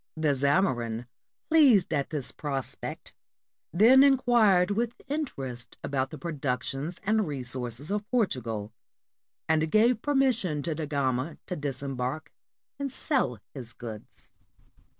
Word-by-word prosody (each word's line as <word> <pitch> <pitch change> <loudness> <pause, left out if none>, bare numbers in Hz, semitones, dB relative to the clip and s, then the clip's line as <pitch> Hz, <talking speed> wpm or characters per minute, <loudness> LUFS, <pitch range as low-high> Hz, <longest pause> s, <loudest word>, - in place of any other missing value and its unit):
The 155 -2 +2
Zamorin, 130 -6 +1 0.4
pleased 255 - +5
at 140 -2 0
this 150 -5 -1
prospect, 135 -3 -5 0.6
then 230 +9 +7
inquired 235 -9 +4
with 230 +3 -1
interest 135 - -4
about 130 -1 -1
the 155 - -8
productions 140 +1 -3
and 215 -1 +1
re 140 -4 -4
sources 125 - -3
of 210 0 -2
Portugal, 115 - -1 0.7
and 160 0 +2
gave 220 +4 +3
permission 245 - +1
to 165 - -1
Da 155 0 -4
Gama 140 0 -1
to 180 - -4
disembark 135 -1 -4 0.5
and 280 -1 -3
sell 255 - 0 0.2
his 125 -4 -8
goods. 110 -3 -10
155 Hz, 120 wpm, -28 LUFS, 130-215 Hz, 0.7 s, then